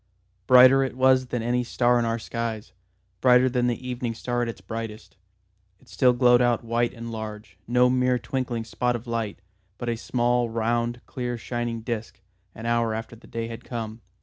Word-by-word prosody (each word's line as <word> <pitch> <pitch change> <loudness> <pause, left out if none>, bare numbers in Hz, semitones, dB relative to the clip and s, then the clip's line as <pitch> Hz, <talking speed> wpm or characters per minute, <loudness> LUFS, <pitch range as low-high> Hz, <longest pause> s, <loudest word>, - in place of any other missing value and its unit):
Brighter 130 +1 +8
it 130 -1 -4
was 130 0 +4
than 120 -2 -3
any 125 +1 +1
star 120 0 +2
in 120 - 0
our 115 0 0
skies; 115 -1 -5 0.5
brighter 125 0 +6
than 125 -1 +1
the 125 +1 -3
evening 120 -2 -3
star 120 +2 -2
at 120 - 0
its 115 - -7
brightest. 115 -1 -7 0.6
It - - -23
still 125 -2 +3
glowed 120 0 +5
out 120 -2 +2
white 115 +1 0
and 115 -1 -8
large, 110 -3 -7
no 125 +1 +4
mere 125 0 +2
twinkling 125 -2 -3
spot 120 +2 -1
of 120 +1 -6
light, 115 -5 -3 0.4
but 120 - -4
a 115 - 0
small 120 0 0
round 120 +1 -1
clear 125 -1 -4
shining 120 0 -3
disc, 110 -4 -5 0.4
an 110 - -8
hour 115 -1 +1
after 115 +1 -6
the 115 - -17
day 115 -1 -4
had 115 +1 -8
come. 115 -2 -6
120 Hz, 185 wpm, -25 LUFS, 115-125 Hz, 0.6 s, Brighter